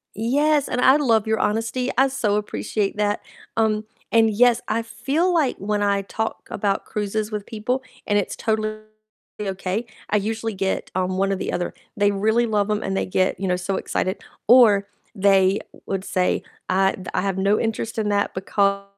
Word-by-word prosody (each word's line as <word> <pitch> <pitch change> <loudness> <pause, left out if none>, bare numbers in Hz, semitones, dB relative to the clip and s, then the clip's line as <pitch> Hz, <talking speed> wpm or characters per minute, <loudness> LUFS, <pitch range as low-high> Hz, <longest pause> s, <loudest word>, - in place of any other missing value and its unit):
Yes, 285 +6 +2
and 250 - -1
I 265 +3 +6
love 230 -7 +2
your 220 0 +1
honesty, 225 +4 0
I 270 +1 +5
so 235 -6 0
appreciate 210 -1 -2
that, 210 0 0 0.4
um, 215 -1 +1 0.3
and 225 -1 +5
yes, 240 +2 +4
I 230 - 0
feel 280 +10 0
like 310 -7 +2
when 205 +1 -1
I 200 -1 +1
talk 220 +3 -4
about 200 -1 -1
cruises 210 +1 -2
with 210 -1 -4
people, 245 +4 -2 0.3
and 205 - +3
it's 205 - -2
totally 215 -1 -1 0.6
okay, 195 +2 -2 0.2
I 210 - +3
usually 220 +2 -2
get, 195 0 -2
um, 185 0 0
one 195 +1 +1
or - - 0
the - - -3
other; 175 - -2 0.2
they 205 0 +3
really 220 +4 +2
love 210 -2 +1
'em 210 - 0
and 195 0 -2
they - - 0
get, 185 0 +1
you 195 - -2
know, 180 - +2
so 185 +2 -2
excited, 185 +2 -2 0.3
or 210 -5 +6 0.3
they 195 -1 +4 0.3
would 195 -1 -2
say, 185 -2 0 0.3
"I 190 +1 +3
th 185 - -9
I - - +2
have 195 -1 -1
no 200 +2 +3
interest 225 0 -2
in 210 -1 0
that 200 0 0
because" 200 +1 +1
210 Hz, 185 wpm, -23 LUFS, 195-225 Hz, 0.6 s, I